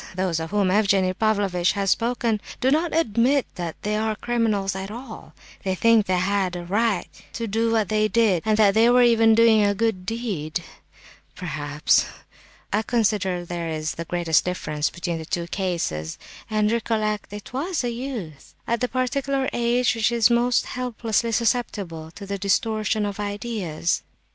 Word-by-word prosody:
Those 185 -3 0
of 160 0 -4
whom 200 -2 +1
Evgenie 195 -2 +3
Pavlovitch 195 -4 +1
has 195 -1 0
spoken, 230 -2 0 0.2
do 260 - +2
not 320 +3 +1
admit 260 -2 +2
that 170 -2 -5
they 210 +1 0
are 215 0 0
criminals 215 -5 0
at 190 +1 -5
all; 235 +1 -9 0.3
they 190 -1 -1
think 230 +1 +4
they 185 0 +2
had 190 -1 0
a 175 -1 -6
right 205 +1 0 0.3
to 230 - -3
do 225 +2 0
what 220 -3 +1
they 215 0 +2
did, 215 -5 +2
and 215 -1 +2
that 205 -2 +5
they 225 +3 +5
were 250 0 +6
even 225 -2 +5
doing 225 -2 +5
a 205 0 +2
good 215 -3 0
deed, 190 -9 -3 0.7
perhaps. 150 -4 +1 0.7
I 210 - +3
consider 205 -6 0
there 170 -1 -4
is 155 -2 -3
the 165 +4 -6
greatest 170 -2 +1
difference 155 -4 -2
between 170 -1 -4
the - - -6
two 170 +1 -2
cases. 170 - -3 0.3
And 215 -1 +1
recollect—it 215 -2 -2
was 315 +4 -2
a 240 - -1
youth, 230 - -7
at 235 0 -1
the 250 - +2
particular 265 +1 -1
age 240 +1 +2
which 225 0 +1
is 235 0 +4
most 240 0 +2
helplessly 235 -2 -1
susceptible 205 -8 -1
to 200 - -8
the 200 0 -4
distortion 215 +2 0
of 205 0 -4
ideas!" 205 -6 -2
210 Hz, 165 wpm, -23 LUFS, 185-230 Hz, 0.7 s, were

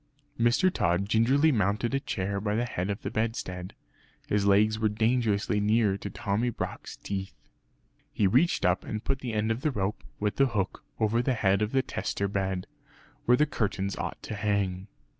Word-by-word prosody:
Mr. 120 +11 +3
Tod 90 +3 +1
gingerly 130 +9 +4
mounted 105 +1 +1
a 135 - +2
chair 100 -5 -2
by 105 0 -1
the 120 +2 +1
head 95 -5 -3
of 100 +2 -3
the - - -3
bedstead. 95 -5 -3 0.5
His 100 -1 +1
legs 105 +2 +4
were 110 -1 +2
dangerously 110 -1 +1
near 105 -1 +3
to 100 - -5
Tommy 100 +5 -1
Brock's 120 - -5
teeth. 95 -1 -5 0.8
He 105 - +1
reached 130 - +3
up 90 +1 +2
and 110 0 -5
put 135 -1 -1
the 125 -4 -4
end 110 +1 +1
of 115 +3 -3
rope, 100 +1 -2 0.2
with 105 0 -1
the 135 - +5
hook, 100 -6 -2 0.2
over 110 +1 +2
the 125 +1 0
head 100 -2 +2
of 105 +1 0
the 135 -1 +2
tester 100 - -2
bed, 95 -2 -2 0.6
where 125 +1 +5
the 150 - +4
curtains 100 -7 -2
ought - - -4
to - - -5
hang. 100 -2 -1
105 Hz, 180 wpm, -28 LUFS, 100-115 Hz, 0.8 s, the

